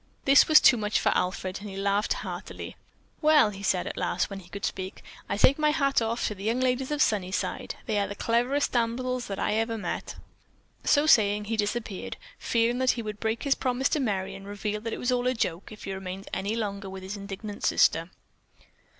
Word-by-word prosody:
This 275 +1 +7
was 310 -1 +8
too 245 - +6
much 210 -1 0
for - - +2
Alfred 185 +1 -1
and 205 - -7
he 195 - -7
laughed 200 +2 +1
heartily. - - -7 0.5
"Well," 300 -8 +5
he 195 -1 -9
said 190 -2 +1
at - - -5
last, - - -1
when 195 - -5
he 175 -2 -15
could 200 - -4
speak, 185 0 -5 0.3
"I - - -1
take 265 +6 +5
off - - -6
my 300 - +4
hat 280 -2 +1
to 225 -1 +1
the 195 -1 -10
young 230 +4 0
ladies 255 0 0
of 295 0 +3
Sunnyside. 190 -3 -1
They 215 -3 0
are 200 - 0
the 200 - -6
cleverest 245 +7 +1
damsels 245 +1 -1
that 195 - -4
I - - 0
ever 225 +1 0
met." 210 - -4 0.7
So 290 +1 +4
saying, 210 -7 +4
he 225 +2 -2
disappeared, 210 -1 -3 0.2
fearing 235 +1 +1
that 260 0 +2
he 230 - -3
would 210 -1 -6
break 225 +1 -1
his 280 - +3
promise 255 +1 0
to 305 - +1
Merry 200 -8 -1
and 195 0 -10
reveal 205 +1 -3
that 230 +1 -4
it - - -3
was 245 - -1
all 250 0 +1
a 255 - +1
joke 180 -5 -2
if 215 - -11
he 195 - -4
remained 190 0 -6
any 200 +3 -1
longer 200 -3 -3
with 190 0 -8
his 190 +2 -5
indignant 200 +1 -7
sister. 165 +2 +3
215 Hz, 220 wpm, -27 LUFS, 200-245 Hz, 0.7 s, was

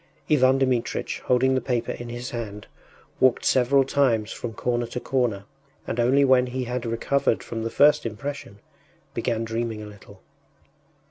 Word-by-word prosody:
Ivan 130 -2 +5
Dmitritch, 130 -3 -1
holding 130 +1 +3
the 130 - +1
paper 120 -3 -1
in 120 0 -7
his 120 +1 -6
hand, 105 -4 -6 0.5
walked 130 -2 +3
several 135 +2 +4
times 125 -6 +1
from 115 -2 -6
corner 120 +1 -1
to 125 - -5
corner, 120 -7 -1 0.4
and 120 - -3
only 135 +4 +4
when 130 -1 +4
he 130 +1 -3
had 125 0 -3
recovered 120 +2 0
from 115 - -5
the 115 - -2
first 145 +5 +4
impression 115 -1 -6 0.6
began 115 -2 -1
dreaming 115 -1 -3
a - - -8
little. 100 -1 -14
120 Hz, 155 wpm, -24 LUFS, 115-130 Hz, 0.6 s, Ivan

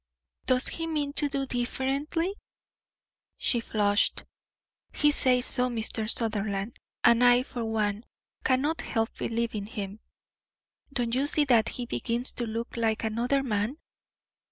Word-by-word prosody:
"Does 255 -1 +3
he 330 0 -2
mean 295 -3 -1
to 290 -1 +1
do 275 -1 -1
differently?" 270 +8 -1 1.0
She 240 - +2
flushed. 205 -2 +1 0.7
"He 295 0 +4
says 255 -3 +3
so, 250 -1 0
Mr. 225 -2 -2
Sutherland. 210 -2 -1 0.2
And 235 +1 +5
I, 245 0 +6
for 245 -3 -5
one, 215 0 -1 0.4
cannot 280 +5 +1
help 225 0 -2
believing 225 -3 -2
him. 205 -2 -6 0.9
Don't 240 -3 -1
you 270 +3 +2
see 295 0 +5
that 235 -5 +4
he 245 - -2
begins 240 +1 -2
to 240 - -3
look 230 +2 -4
like 225 -1 0
another 240 +5 0
man?" 220 +2 -1
240 Hz, 130 wpm, -28 LUFS, 220-270 Hz, 1.0 s, I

